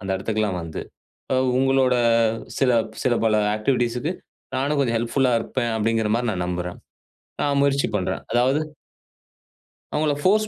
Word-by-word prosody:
அந்த 95 - -5
இடத்துக்கெல்லாம் 105 -1 -1
வந்து. 80 -1 -6 0.5
அ - - +3 0.2
உங்களோட 135 -1 +3 0.6
சில 135 -2 +3 0.3
சில 125 - +3
பல 110 -1 +3 0.2
ஆக்டிவிட்டீஸ்க்கு 120 +4 0 0.5
நானும் 140 +2 0
கொஞ்சம் 120 -4 +1
ஹெல்ப்ஃபுல்லா 125 +2 +1
இருப்பேன், 115 +1 -2
அப்டிங்கிற 110 0 +1
மாரி 120 0 -1
நான் 90 -2 -2
நம்புறேன். 90 0 -4 0.6
நான் 140 -1 +1
முயற்சி 140 0 +2
பண்றேன். 95 - -2
அதாவது 130 +5 +3 1.3
அவங்கள 150 0 +1
போர்ஸ் 215 +3 +3
120 Hz, 130 wpm, -23 LUFS, 110-135 Hz, 1.3 s, அ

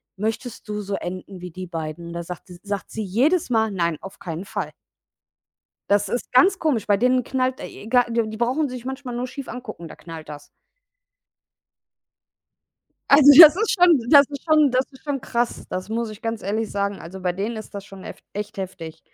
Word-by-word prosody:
„Möchtest 220 +2 -4
du 210 0 -3
so 200 -1 -3
enden 185 0 -7
wie 180 0 -7
die 185 +2 -7
beiden?“ 165 0 -6
Da 170 0 -4
sagte 180 +1 -9
sagt 200 -1 -4
sie 220 - -4
jedes 255 - +1
Mal: 220 -2 +2
„Nein, 170 -5 -1
auf 195 - -10
keinen 170 +1 -6
Fall.“ - - -4 1.2
Das 205 0 +3
ist 240 - -3
ganz 375 +10 +5
komisch, 280 -11 0
bei 205 - +4
denen 255 +3 +2
knallt 260 +1 -1
e - - -9
e 215 - -10
gar 245 0 +3
die 225 -2 -1
brauchen 260 +5 0
sich 250 -1 -8
manchmal 265 -2 -5
nur 245 +1 -3
schief 275 +1 -8
angucken, 220 -9 -8
da - - -11
knallt 165 -2 -10
das. 145 -1 -10 2.6
Also 285 0 +8
das 315 -2 +12
ist 435 +3 0
schon 350 -6 +5
das 285 -1 +8
ist 280 -1 -8
schon 305 -3 +4
das 255 +1 +2
ist 265 - -18
schon 285 -3 -3
krass. 235 +1 -2
Das 185 +2 -5
muss 230 0 -2
ich 215 0 -11
ganz 225 -1 -3
ehrlich 215 +3 -2
sagen. 200 0 -2
Also 185 +3 -9
bei 180 -1 0
denen 210 +5 -3
ist 215 - -9
das 200 -1 -6
schon 195 -2 -12
eft - - -10
echt 205 0 -6
heftig. 180 -4 -7
220 Hz, 200 wpm, -23 LUFS, 190-255 Hz, 2.6 s, das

